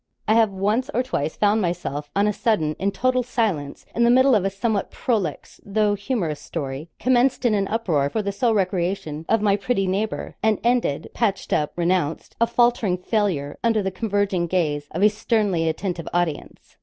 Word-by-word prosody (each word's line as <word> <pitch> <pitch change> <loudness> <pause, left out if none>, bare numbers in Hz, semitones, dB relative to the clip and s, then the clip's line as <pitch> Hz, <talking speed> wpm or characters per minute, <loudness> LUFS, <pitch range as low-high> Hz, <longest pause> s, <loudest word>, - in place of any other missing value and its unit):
I 215 - +4
have 225 -1 +4
once 210 +7 -1
or 250 - +2
twice 160 - -2
found 210 +1 +2
myself 160 -5 -3
on 200 +1 +3
a 210 - +1
sudden 160 -10 0
in 195 +3 +1
total 255 +4 +1
silence 215 - -2
in 235 - +1
the 235 - +5
middle 260 +2 +5
of 210 -5 +3
a 195 - +1
somewhat 200 +1 -1
prolix, 200 - -3
though 210 +1 +1
humorous 200 - -2
story, 145 0 -5
commenced 255 +1 +2
in 235 - +4
an 200 -2 +1
uproar 175 -11 0
for 215 +7 -2
the 200 - -1
sole 225 +3 +1
recreation 180 -5 -1
of 225 -2 +2
my 200 -2 +4
pretty 200 0 0
neighbour, 200 +4 -2
and 220 -2 +2
ended 235 - 0
patched 205 -5 -1
up, 150 -1 0
renounced 175 -3 -1
a 230 - +5
faltering 235 -5 +2
failure, 180 -7 -1
under 225 -3 +2
the 190 - -1
converging 200 -3 0
gaze 150 -5 -1
of 175 +5 -2
a - - +8
sternly 210 -6 +1
attentive 170 0 -3
audience. 175 -4 -3
200 Hz, 185 wpm, -23 LUFS, 170-225 Hz, -, a